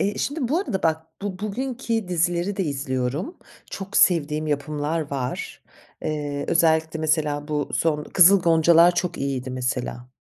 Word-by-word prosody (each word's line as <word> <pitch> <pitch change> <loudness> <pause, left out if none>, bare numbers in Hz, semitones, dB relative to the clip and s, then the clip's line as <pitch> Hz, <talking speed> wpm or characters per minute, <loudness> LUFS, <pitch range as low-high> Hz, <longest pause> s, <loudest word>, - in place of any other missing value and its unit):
Eee, 205 +1 -1
şimdi 285 -4 -2
bu 310 - +1
arada 200 - -3
bak, 160 0 0 0.2
bu 195 -3 -4
bugünki 230 0 -3
dizileri 175 +2 0
de 195 - 0
izliyorum. 140 - -3 0.3
Çok 195 +1 -5
sevdiğim 155 -3 +3
yapımlar 150 +1 -2
var. 130 -3 -4 0.4
Eee, 145 -2 -3
özellikle 160 -1 +2
mesela 150 -1 0
bu 150 -1 -2
son 150 -2 0
Kızıl 190 +1 +6
Goncalar 170 +1 +5
çok 175 0 -2
iyiydi 135 -2 -3
mesela. 125 -1 -3
160 Hz, 140 wpm, -23 LUFS, 145-185 Hz, 0.4 s, Kızıl